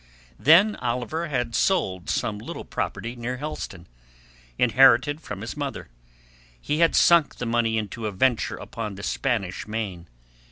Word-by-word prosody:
Then 175 Hz, -, +5 dB
Oliver 125 Hz, +7 st, -2 dB
had 125 Hz, -5 st, -2 dB
sold 95 Hz, -, 0 dB
some 105 Hz, -1 st, -1 dB
little 110 Hz, -, -7 dB
property 120 Hz, +2 st, -4 dB
near 120 Hz, +1 st, -4 dB
Helston, 130 Hz, -, -6 dB, 0.7 s
inherited 130 Hz, +4 st, +4 dB
from 100 Hz, -8 st, -7 dB
his 115 Hz, -, -6 dB
mother; 140 Hz, -, -5 dB, 0.7 s
he 150 Hz, -, -2 dB
had 165 Hz, -1 st, +4 dB
sunk 170 Hz, -3 st, +5 dB
the 125 Hz, -, -5 dB
money 115 Hz, -1 st, +1 dB
into 110 Hz, +1 st, -4 dB
a -, -, -3 dB
venture 120 Hz, +4 st, +1 dB
upon 110 Hz, -3 st, -6 dB
the 100 Hz, -, -9 dB
Spanish 105 Hz, -10 st, -2 dB
Main. 100 Hz, -6 st, -4 dB
120 Hz, 145 wpm, -25 LUFS, 105-145 Hz, 0.7 s, Then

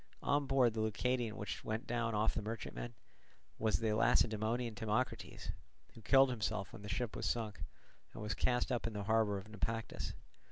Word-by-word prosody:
On 145 Hz, 0 st, +2 dB
board 130 Hz, -4 st, +4 dB
the 110 Hz, -, -3 dB
Leucadian 115 Hz, +1 st, 0 dB
which 105 Hz, -, -4 dB
went 110 Hz, +1 st, -2 dB
down 115 Hz, -2 st, 0 dB
off 105 Hz, +2 st, +3 dB
the -, -, -1 dB
merchantman, 115 Hz, +2 st, -5 dB, 0.6 s
was 110 Hz, -1 st, +3 dB
the 110 Hz, -2 st, +1 dB
Lacedaemonian 110 Hz, +2 st, +2 dB
Timocrates, 110 Hz, +4 st, -2 dB, 0.4 s
who 115 Hz, -, -12 dB
killed 135 Hz, +3 st, +6 dB
himself 105 Hz, -3 st, -2 dB
when 115 Hz, -, -8 dB
the 105 Hz, -, -7 dB
ship 115 Hz, +3 st, -1 dB
was -, -, -1 dB
sunk, 110 Hz, -3 st, -2 dB, 0.5 s
and -, -, -7 dB
was 105 Hz, -1 st, -1 dB
cast 125 Hz, +4 st, +1 dB
up 120 Hz, -2 st, 0 dB
in 115 Hz, -, -4 dB
the 105 Hz, -1 st, -3 dB
harbour 110 Hz, -1 st, +3 dB
of 95 Hz, +1 st, -7 dB
Naupactus. 110 Hz, 0 st, -3 dB
110 Hz, 175 wpm, -36 LUFS, 105-120 Hz, 0.6 s, killed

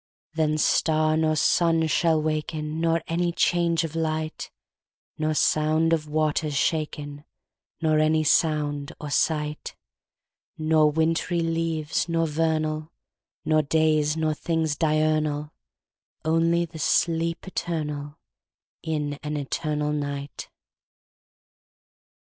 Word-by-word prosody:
Then 155 Hz, -1 st, +1 dB
star 155 Hz, 0 st, +2 dB
nor 155 Hz, 0 st, +2 dB
sun 165 Hz, +1 st, +3 dB
shall 160 Hz, +1 st, +2 dB
waken, 155 Hz, 0 st, -3 dB
Nor 165 Hz, -1 st, +1 dB
any 170 Hz, +1 st, 0 dB
change 170 Hz, -1 st, +1 dB
of 165 Hz, -1 st, -5 dB
light:Nor 155 Hz, -1 st, -5 dB
sound 155 Hz, +2 st, +2 dB
of 155 Hz, -2 st, -1 dB
waters 155 Hz, -1 st, 0 dB
shaken, 145 Hz, -1 st, -2 dB, 0.6 s
Nor 155 Hz, -1 st, +3 dB
any 155 Hz, 0 st, +3 dB
sound 150 Hz, -1 st, +1 dB
or 150 Hz, -2 st, -6 dB
sight:Nor 155 Hz, 0 st, -2 dB
wintry 165 Hz, +2 st, 0 dB
leaves 165 Hz, -1 st, -1 dB
nor 165 Hz, 0 st, +1 dB
vernal, 155 Hz, 0 st, -1 dB, 0.6 s
Nor 155 Hz, 0 st, +3 dB
days 155 Hz, 0 st, +2 dB
nor 155 Hz, -1 st, +1 dB
things 160 Hz, -1 st, -1 dB
diurnal; 155 Hz, -1 st, 0 dB, 0.7 s
Only 165 Hz, +2 st, +2 dB
the 160 Hz, -1 st, -11 dB
sleep 165 Hz, +2 st, +1 dB
eternalIn 150 Hz, -5 st, -4 dB, 0.7 s
an 150 Hz, -1 st, -3 dB
eternal 150 Hz, +1 st, -2 dB
night. 145 Hz, -1 st, -5 dB
155 Hz, 95 wpm, -25 LUFS, 150-165 Hz, 0.7 s, sun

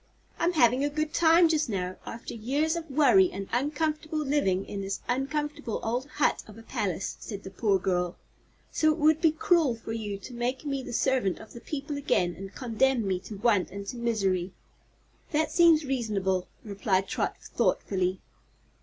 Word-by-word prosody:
"I'm 345 Hz, +1 st, +2 dB
having 255 Hz, -3 st, +4 dB
a 290 Hz, -, +1 dB
good 310 Hz, +1 st, -2 dB
time, 335 Hz, +1 st, +6 dB
just 310 Hz, -4 st, +1 dB
now, 185 Hz, -3 st, -2 dB
after 230 Hz, -, -7 dB
years 280 Hz, +9 st, 0 dB
of 330 Hz, -2 st, -5 dB
worry 310 Hz, +7 st, +5 dB
and 195 Hz, 0 st, -6 dB
uncomfortable 305 Hz, +4 st, -1 dB
living 275 Hz, -11 st, +1 dB
in 200 Hz, -, -5 dB
this 195 Hz, 0 st, -3 dB
uncomfortable 290 Hz, -1 st, -2 dB
old 245 Hz, +4 st, -1 dB
hut 295 Hz, -2 st, +1 dB
of 215 Hz, 0 st, -12 dB
a 225 Hz, -, -12 dB
palace," 190 Hz, -4 st, -3 dB
said 205 Hz, -3 st, -7 dB
the 190 Hz, -, -8 dB
poor 200 Hz, 0 st, +2 dB
girl, 180 Hz, -1 st, -1 dB, 0.5 s
"so 310 Hz, 0 st, +3 dB
it 305 Hz, -, -2 dB
would 310 Hz, 0 st, +3 dB
be 325 Hz, -, +6 dB
cruel 335 Hz, -, +2 dB
for 225 Hz, 0 st, -8 dB
you 210 Hz, -3 st, -4 dB
to 220 Hz, +5 st, -10 dB
make 245 Hz, +4 st, -2 dB
me 275 Hz, -2 st, -2 dB
the 250 Hz, -, -8 dB
servant 245 Hz, -5 st, +1 dB
of -, -, -13 dB
the 235 Hz, -, -10 dB
people 290 Hz, 0 st, -4 dB
again 180 Hz, -11 st, +1 dB
and 195 Hz, 0 st, -9 dB
condemn 245 Hz, -1 st, +1 dB
me 185 Hz, -1 st, 0 dB
to 195 Hz, +3 st, -9 dB
want 205 Hz, -2 st, +2 dB
and 200 Hz, +2 st, -6 dB
misery." 195 Hz, -7 st, 0 dB, 0.8 s
"That 310 Hz, +1 st, +1 dB
seems 325 Hz, -2 st, +5 dB
reason'ble," 205 Hz, -8 st, -1 dB, 0.2 s
replied 195 Hz, -2 st, 0 dB
Trot, -, -, -1 dB
thoughtfully. 185 Hz, -1 st, -1 dB
240 Hz, 175 wpm, -28 LUFS, 195-300 Hz, 0.8 s, time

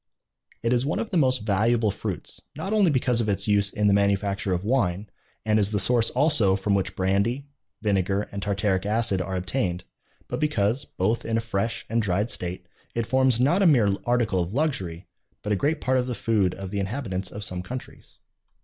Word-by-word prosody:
It 115 Hz, +1 st, +2 dB
is 120 Hz, 0 st, +2 dB
one 145 Hz, -, -1 dB
of 225 Hz, -, -3 dB
the 185 Hz, -, +1 dB
most 130 Hz, -7 st, +2 dB
valuable 110 Hz, +2 st, +2 dB
fruits, 100 Hz, -3 st, -6 dB
not 195 Hz, +3 st, -3 dB
only 205 Hz, -5 st, +4 dB
because 125 Hz, -4 st, +2 dB
of 105 Hz, -, -1 dB
its 100 Hz, -, -1 dB
use 100 Hz, -1 st, +3 dB
in 105 Hz, -, -1 dB
the 100 Hz, -, +5 dB
manufacture 100 Hz, 0 st, +1 dB
of 90 Hz, 0 st, -1 dB
wine, 105 Hz, -4 st, 0 dB, 0.4 s
and 110 Hz, 0 st, +3 dB
is 100 Hz, -1 st, +2 dB
the 105 Hz, -, -1 dB
source 115 Hz, +3 st, +3 dB
also 125 Hz, -8 st, +3 dB
from 100 Hz, +1 st, -1 dB
which 100 Hz, -1 st, 0 dB
brandy, 100 Hz, +8 st, 0 dB, 0.4 s
vinegar, 100 Hz, -1 st, +1 dB
and 100 Hz, -, -5 dB
tartaric 100 Hz, -1 st, 0 dB
acid 105 Hz, -2 st, +1 dB
are 95 Hz, +1 st, -3 dB
obtained, 90 Hz, -1 st, -2 dB, 0.4 s
but -, -, -4 dB
because, 130 Hz, -3 st, 0 dB
both 110 Hz, +2 st, -1 dB
in 115 Hz, 0 st, -1 dB
a -, -, +2 dB
fresh 115 Hz, 0 st, -2 dB
and 115 Hz, +1 st, +1 dB
dried 105 Hz, +3 st, 0 dB
state, 90 Hz, 0 st, -4 dB, 0.3 s
it 115 Hz, -1 st, 0 dB
forms 130 Hz, -1 st, +3 dB
not 150 Hz, +10 st, +3 dB
a 195 Hz, -, +5 dB
mere 120 Hz, -10 st, +4 dB
article 120 Hz, -6 st, +1 dB
of 90 Hz, +5 st, -3 dB
luxury, 95 Hz, -, -1 dB, 0.4 s
but 105 Hz, -, -2 dB
a -, -, +3 dB
great 150 Hz, +9 st, 0 dB
part 130 Hz, 0 st, +1 dB
of 125 Hz, -, -2 dB
the 125 Hz, -, -3 dB
food 105 Hz, -6 st, +1 dB
of 95 Hz, -1 st, -7 dB
the 100 Hz, -, -2 dB
inhabitants 95 Hz, -2 st, -3 dB
of 105 Hz, -, -7 dB
some 90 Hz, -2 st, -4 dB
countries. 125 Hz, +8 st, -9 dB
105 Hz, 205 wpm, -25 LUFS, 95-125 Hz, 0.4 s, the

